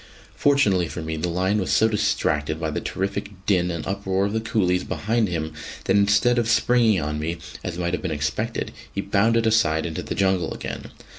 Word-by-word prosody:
Fortunately 120 Hz, -, +3 dB
for 80 Hz, -, -6 dB
me, 80 Hz, 0 st, -3 dB
the 85 Hz, +3 st, -2 dB
lion 95 Hz, +4 st, +1 dB
was 95 Hz, -, -2 dB
so 110 Hz, -, +4 dB
distracted 80 Hz, -8 st, 0 dB
by 80 Hz, -2 st, -2 dB
the -, -, -3 dB
terrific 95 Hz, +2 st, -3 dB, 0.2 s
din 90 Hz, -3 st, +2 dB
and 85 Hz, -2 st, -4 dB
uproar 95 Hz, 0 st, -1 dB
of 100 Hz, -, -2 dB
the 110 Hz, -, +1 dB
coolies 90 Hz, -5 st, +1 dB
behind 110 Hz, +1 st, 0 dB
him 80 Hz, -3 st, -3 dB, 0.3 s
that 95 Hz, -, +2 dB
instead 100 Hz, +4 st, +4 dB
of 115 Hz, -1 st, 0 dB
springing 115 Hz, -3 st, +4 dB
on 75 Hz, 0 st, -2 dB
me, 80 Hz, +3 st, -2 dB, 0.3 s
as 85 Hz, -, -4 dB
might 85 Hz, 0 st, -1 dB
have -, -, -1 dB
been 90 Hz, -, -2 dB
expected, 75 Hz, -1 st, -2 dB, 0.2 s
he -, -, -5 dB
bounded 115 Hz, +4 st, +2 dB
aside 85 Hz, -9 st, +2 dB
into 80 Hz, -2 st, -3 dB
the -, -, -5 dB
jungle 95 Hz, -2 st, +1 dB
again. -, -, -6 dB
95 Hz, 200 wpm, -23 LUFS, 85-110 Hz, 0.3 s, so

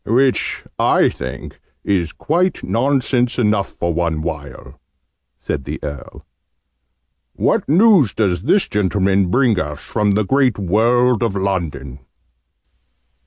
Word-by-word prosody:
"Which, 130 Hz, +3 st, 0 dB, 0.2 s
I -, -, +3 dB
think, -, -, -8 dB, 0.2 s
is 90 Hz, -5 st, 0 dB
quite 175 Hz, +3 st, -1 dB
nonsense 125 Hz, -1 st, 0 dB
enough 105 Hz, -4 st, 0 dB
for 85 Hz, 0 st, -2 dB
one 80 Hz, -2 st, -1 dB
while!" 75 Hz, -3 st, -7 dB, 0.6 s
said 65 Hz, -, -5 dB
the -, -, -5 dB
Earl. 70 Hz, -2 st, -8 dB, 1.1 s
"What -, -, 0 dB
news 175 Hz, -, +4 dB
does 90 Hz, -6 st, 0 dB
this 195 Hz, -, +2 dB
gentleman 100 Hz, -1 st, +1 dB
bring 120 Hz, -2 st, +2 dB
us 75 Hz, -4 st, -4 dB
from 105 Hz, -2 st, -1 dB
the 105 Hz, +1 st, 0 dB
great 130 Hz, 0 st, +2 dB
world 115 Hz, +5 st, +2 dB
of 115 Hz, -4 st, -1 dB
London?" 80 Hz, -9 st, -3 dB
105 Hz, 120 wpm, -18 LUFS, 85-125 Hz, 1.1 s, news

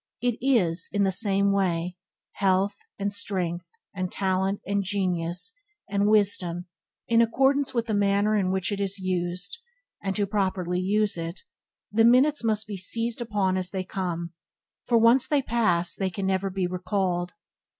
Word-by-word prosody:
It 245 Hz, -1 st, -1 dB
is, 190 Hz, -11 st, +2 dB
in 205 Hz, -1 st, +1 dB
the 195 Hz, -, +2 dB
same 200 Hz, 0 st, +2 dB
way, 180 Hz, -3 st, 0 dB, 0.4 s
health, 195 Hz, +1 st, +1 dB, 0.2 s
and 200 Hz, 0 st, -2 dB
strength, 180 Hz, -4 st, -2 dB, 0.3 s
and 185 Hz, -2 st, -3 dB
talent, 190 Hz, 0 st, 0 dB
and 200 Hz, +1 st, 0 dB
genius, 185 Hz, -, -1 dB, 0.3 s
and 200 Hz, 0 st, +1 dB
wisdom, 190 Hz, -5 st, +2 dB, 0.4 s
in 230 Hz, 0 st, +4 dB
accordance 270 Hz, +3 st, +2 dB
with 235 Hz, -1 st, +1 dB
the 220 Hz, -, -2 dB
manner 205 Hz, +1 st, +2 dB
in 195 Hz, -3 st, +1 dB
which 190 Hz, +1 st, 0 dB
it 200 Hz, 0 st, -2 dB
is 200 Hz, 0 st, -1 dB
used; 185 Hz, -, -2 dB, 0.4 s
and 195 Hz, -1 st, -2 dB
to 205 Hz, -, +1 dB
properly 185 Hz, -3 st, -1 dB
use 205 Hz, 0 st, +1 dB
it, 165 Hz, +2 st, -5 dB, 0.5 s
the 225 Hz, +2 st, +3 dB
minutes 255 Hz, +4 st, +4 dB
must 220 Hz, -1 st, +1 dB
be 205 Hz, -2 st, -6 dB
seized 230 Hz, +5 st, -2 dB
upon 205 Hz, -5 st, 0 dB
as 185 Hz, -1 st, -2 dB
they 190 Hz, -1 st, -3 dB
come, 175 Hz, -3 st, -4 dB, 0.5 s
for 235 Hz, -, +4 dB
once 230 Hz, +3 st, +5 dB
they 290 Hz, -2 st, +2 dB
are -, -, -21 dB
past 195 Hz, -8 st, +1 dB
they 190 Hz, -1 st, 0 dB
can 190 Hz, +2 st, -4 dB
never 190 Hz, 0 st, 0 dB
be 190 Hz, -1 st, -2 dB
recalled. 180 Hz, -1 st, -1 dB
195 Hz, 165 wpm, -26 LUFS, 185-215 Hz, 0.5 s, once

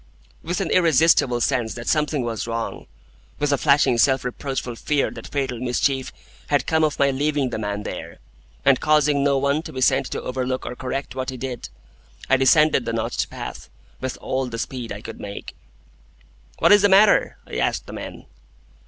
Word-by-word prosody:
With 175 Hz, +3 st, -2 dB
an 180 Hz, -, -2 dB
irresistible 160 Hz, -7 st, +4 dB
sense 120 Hz, -4 st, 0 dB
that 120 Hz, -1 st, -8 dB
something 150 Hz, -3 st, +1 dB
was 115 Hz, -1 st, -3 dB
wrong,—with 115 Hz, -, -5 dB
a -, -, +2 dB
flashing 140 Hz, -4 st, +3 dB
self 135 Hz, 0 st, +3 dB
reproachful 130 Hz, -1 st, -4 dB
fear 145 Hz, +2 st, 0 dB
that -, -, -9 dB
fatal 135 Hz, -4 st, -2 dB
mischief 130 Hz, +2 st, 0 dB, 0.4 s
had -, -, +1 dB
come 160 Hz, 0 st, +2 dB
of 150 Hz, -2 st, +1 dB
my 140 Hz, 0 st, +3 dB
leaving 140 Hz, -1 st, 0 dB
the 110 Hz, -, -3 dB
man 105 Hz, -1 st, -3 dB
there, 85 Hz, -4 st, -7 dB, 0.5 s
and 135 Hz, -2 st, +5 dB
causing 150 Hz, -2 st, +3 dB
no 140 Hz, -1 st, +3 dB
one 140 Hz, +3 st, +1 dB
to -, -, -9 dB
be 130 Hz, -, -6 dB
sent 135 Hz, +1 st, +3 dB
to -, -, -4 dB
overlook 130 Hz, 0 st, -3 dB
or 125 Hz, -, -5 dB
correct 130 Hz, +2 st, -4 dB
what 130 Hz, -1 st, -3 dB
he 130 Hz, -, -5 dB
did,—I 65 Hz, -, -5 dB
descended 135 Hz, 0 st, +4 dB
the 115 Hz, -, -2 dB
notched 115 Hz, -1 st, -2 dB
path -, -, -8 dB, 0.3 s
with 130 Hz, -1 st, -4 dB
all 130 Hz, 0 st, -2 dB
the 115 Hz, -2 st, -6 dB
speed 120 Hz, 0 st, -5 dB
I 100 Hz, +1 st, -6 dB
could 115 Hz, -, -9 dB
make. 100 Hz, 0 st, -8 dB, 1.0 s
"What -, -, +4 dB
is 205 Hz, -1 st, +7 dB
the 205 Hz, -, +4 dB
matter?" 200 Hz, +2 st, +5 dB
I -, -, -6 dB
asked -, -, 0 dB
the -, -, -10 dB
men. -, -, -8 dB
130 Hz, 180 wpm, -22 LUFS, 120-145 Hz, 1.0 s, is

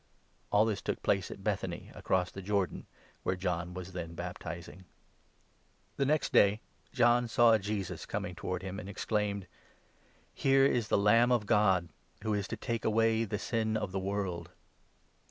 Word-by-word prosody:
All 105 Hz, +2 st, +5 dB
this 105 Hz, -3 st, -1 dB
took -, -, -3 dB
place -, -, +1 dB
at -, -, -9 dB
Be.tb.any, -, -, -3 dB
across 90 Hz, -1 st, 0 dB
the 95 Hz, -, -7 dB
Jordan, 100 Hz, -1 st, -1 dB, 0.3 s
where 95 Hz, -, 0 dB
John 90 Hz, -1 st, -2 dB
28 -, -, -12 dB
was 95 Hz, 0 st, -7 dB
then 85 Hz, -2 st, -5 dB
baptizing. 85 Hz, +1 st, -7 dB, 1.1 s
The 140 Hz, -, +1 dB
next 155 Hz, 0 st, +1 dB
day 100 Hz, +2 st, +5 dB, 0.3 s
John 120 Hz, 0 st, +4 dB
saw 115 Hz, -1 st, +5 dB
Jesus 100 Hz, -2 st, -4 dB
coming 90 Hz, -, -3 dB
towards 90 Hz, +1 st, -4 dB
him, 95 Hz, +1 st, -5 dB
and 95 Hz, -, -8 dB
29 -, -, -6 dB
exclaimed: 100 Hz, -1 st, -1 dB, 0.5 s
" -, -, -34 dB, 0.3 s
Here 135 Hz, 0 st, +4 dB
is 120 Hz, -5 st, +2 dB
the -, -, +2 dB
Lamb 115 Hz, +4 st, +5 dB
of 120 Hz, -4 st, +2 dB
God, 95 Hz, -6 st, +3 dB, 0.3 s
who 110 Hz, -1 st, 0 dB
is 100 Hz, -2 st, -1 dB
to 115 Hz, -, -5 dB
take 115 Hz, +1 st, -3 dB
away 115 Hz, +1 st, +2 dB
the 105 Hz, 0 st, -3 dB
sin 110 Hz, -1 st, -1 dB
of 105 Hz, -3 st, -3 dB
J* 95 Hz, -, -2 dB
Lev. -, -, -6 dB
a6. 95 Hz, -4 st, -2 dB
ii. -, -, -24 dB
100 Hz, 180 wpm, -31 LUFS, 90-115 Hz, 1.1 s, All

